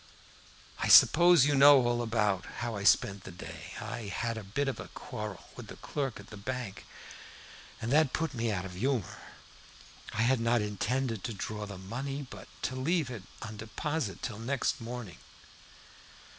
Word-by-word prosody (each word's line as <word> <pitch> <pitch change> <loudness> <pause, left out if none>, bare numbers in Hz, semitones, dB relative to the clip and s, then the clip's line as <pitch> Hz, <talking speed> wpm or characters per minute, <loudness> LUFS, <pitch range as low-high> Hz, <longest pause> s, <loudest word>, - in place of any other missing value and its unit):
"I - - 0
suppose 175 -4 +8
you 145 - +2
know 140 -2 +8
all 120 0 +1
about 105 -5 0 0.2
how 115 -2 -3
I 100 - -4
spent 100 -1 +3
the - - -8
day. 90 - -9
I 115 -3 -5
had 115 +3 -2
a 110 - -6
bit 125 +9 -2
of 135 - -2
a - - -7
quarrel 105 -3 -7
with - - -9
the - - -9
clerk 135 -6 -4
at 100 - -13
the 105 - -8
bank, 120 -1 -5 0.9
and 115 +1 -3
that 150 -2 +4
put 160 +1 -1
me 115 -2 -1
out 95 -3 -2
of 95 - -7
humor. 115 +1 -1 0.9
I 110 - +1
had 130 +1 +3
not 115 +1 +2
intended 110 +2 -1
to 115 - -4
draw 105 +1 -4
the 100 -2 -7
money, 135 +9 -5
but 100 -5 -11 0.2
to 130 - -1
leave 145 +1 0
it 115 -5 -6 0.2
on 110 0 -7
deposit 115 +2 -3
till 110 -4 -4
next 125 +1 -1
morning. 115 -6 -7
115 Hz, 175 wpm, -31 LUFS, 105-135 Hz, 0.9 s, suppose